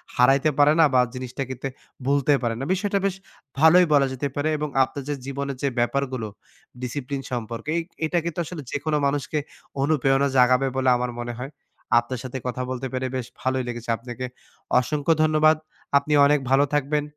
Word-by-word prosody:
হারাইতে 135 +4 +4
পারে 145 +1 +6
না 160 - +8
বা 125 - +6
জিনিসটা 130 +1 -4
কিন্তু 130 +1 -4 0.4
ভুলতে 140 +1 +3
পারে 115 -2 -1
না। - - -3
বিষয়টা 200 +1 0
বেশ 195 -1 0 0.4
ভালোই 175 +3 +7
বলা 140 -2 +5
যেতে 140 +2 -2
পারে 145 +2 0
এবং 150 0 -3
আপনার 135 +1 -5
যে - - +1
জীবনের 140 -1 -4
যে - - +3
ব্যাপারগুলো 130 -2 -1 0.5
ডিসিপ্লিন 135 +2 -4
সম্পর্কে 115 +1 -4
এই - - +1 0.2
এটা 175 +2 0
কিন্তু 170 0 -3
আসলে 165 -1 -7
যেকোনো 150 +1 -1
মানুষকে 145 +2 -1 0.4
অনুপ্রেরণা 140 -1 +2
জাগাবে 125 +2 +4
বলে 130 -1 +2
আমার 125 0 -2
মনে 120 0 -4
হয়। 135 +4 -6 0.5
আপনার 120 +1 -5
সাথে 130 +1 -5
কথা 125 0 -3
বলতে 130 +1 -3
পেরে 130 0 -1
বেশ 130 - -2 0.2
ভালোই 130 0 0
লেগেছে। 120 -1 -6
আপনাকে 120 +1 -6 0.5
অসংখ্য 145 +5 +1
ধন্যবাদ। 155 0 +4 0.4
আপনি 140 +2 0
অনেক 145 0 +4
ভালো 135 +1 +5
থাকবেন, 145 +1 +1
135 Hz, 175 wpm, -24 LUFS, 125-150 Hz, 0.5 s, না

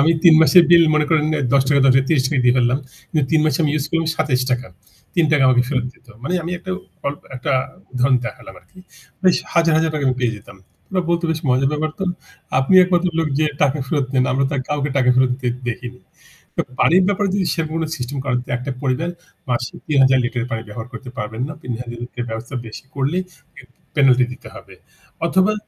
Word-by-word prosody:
আমি 155 +4 +4
৩ 165 -2 +8
মাসের 175 +2 +7
বিল, 170 -1 +8
মনে 155 0 +3
করেন, 155 -2 +3 0.3
৳১০, 140 +1 +3
৳১০, 135 0 +4
৳৩০ 140 -2 +1
দিয়ে 125 0 +5
ফেললাম। 125 +2 +2 0.3
কিন্তু 155 -3 +1
৩ 160 - +4
মাসে 155 -4 +1
আমি 150 - +1
ইউজ 145 -2 -1
করলাম 165 -1 0
৳২৭। 130 -5 0 0.5
৳৩ 155 -4 +3
আমাকে 125 -1 +4
ফেরত 130 -3 -1
দিত। 125 - -28 0.2
মানে, 175 +7 -2
আমি 170 - -4
একটা 185 +1 -8 0.4
অল 140 - -1 0.2
একটা 125 +3 -2 0.4
উদাহরণ 130 +1 +3
দেখালাম 105 -3 -8
আরকি। 185 - -23 0.4
বেশ, 185 -2 +4 0.2
হাজার, 165 -1 +3
হাজার 160 0 +2 0.2
আমি 130 - +1
পেয়ে 120 -2 +1
যেতাম। 100 -1 -14 0.3
ওরা 185 -1 0
বলত, 170 0 +1
“বেশ 160 -1 -2
মজার 130 +2 +3
ব্যাপার 155 +1 -1
তো। 195 - -1 0.5
আপনি 135 +8 +2
একমাত্র 180 0 +1
লোক 160 -1 +1
যে 155 - +3 0.2
টাকা 145 +1 +2
ফেরত 140 -1 0
নেন। 130 -1 +3
আমরা 135 +1 +1
তো - - -2
কাউকে 145 -1 -1
টাকা 125 -2 +4
ফেরত 130 0 +3
দিতে 125 - 0 0.2
দেখিনি।” 125 +1 -7 0.8
পানির 185 +4 +5
ব্যাপারে 205 0 +1
যদি 195 -2 0
সেরকম 160 -2 -3
কোনো 160 -1 -1
সিস্টেম 130 +2 -5
করে, 130 -2 0 0.2
একটা 130 +3 -5
পরিবার 140 +6 -1 0.4
মাসে 125 +1 -2
৩,০০০ 135 -3 +4
লিটার 120 -1 -2
পানি 115 -1 -2
ব্যবহার 110 +3 -7
করতে 125 +2 -8
পারবে 110 -2 -5
না। - - -5
৩,০০০-এর 120 0 -6
বেশি 110 - -10
করলেই 145 +7 0 0.7
পেনাল্টি 130 -3 +5
দিতে - - -14
হবে। - - -13 0.5
অথবা 190 +4 +3
135 Hz, 185 wpm, -20 LUFS, 125-160 Hz, 0.8 s, ৩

